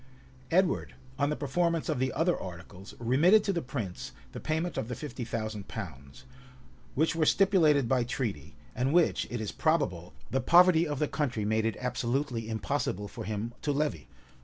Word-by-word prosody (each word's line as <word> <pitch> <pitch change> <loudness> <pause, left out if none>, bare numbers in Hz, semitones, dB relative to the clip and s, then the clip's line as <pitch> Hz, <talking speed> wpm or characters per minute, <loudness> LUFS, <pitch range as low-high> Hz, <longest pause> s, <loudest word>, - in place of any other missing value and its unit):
[] 130 0 -25
Edward, 185 +1 +1 0.2
on 140 0 +2
the 150 - 0
performance 165 +3 0
of - - -1
the 130 0 +1
other 175 +1 +2
articles, 90 +2 -9
remitted 155 - +4
to 200 - 0
the 170 - -1
prince 115 -9 -5
of - - -21
Wales 70 - -22
the - - -7
payment 160 +1 -2
of 110 - -2
the 125 - -4
fifty 140 -1 -6
thousand 110 -3 -4
pounds;[] 70 - -8 0.7
which 160 +4 +2
were 165 - +2
stipulated 160 - +4
by 125 0 +2
treaty, 110 - -4 0.2
and 130 +3 0
which, 175 -1 +3
it 120 - -3
is 110 -2 -3
probable, 140 - 0 0.2
the 135 - +1
poverty 175 -1 +6
of 145 -1 -2
the 150 - +1
country 130 -8 -1
made 110 +1 +1
it 115 - -2
absolutely 125 -1 -2
impossible 110 -2 -2
for - - -8
him 110 +3 -3
to 150 - 0
levy. 140 - -1
130 Hz, 185 wpm, -29 LUFS, 110-155 Hz, 0.7 s, poverty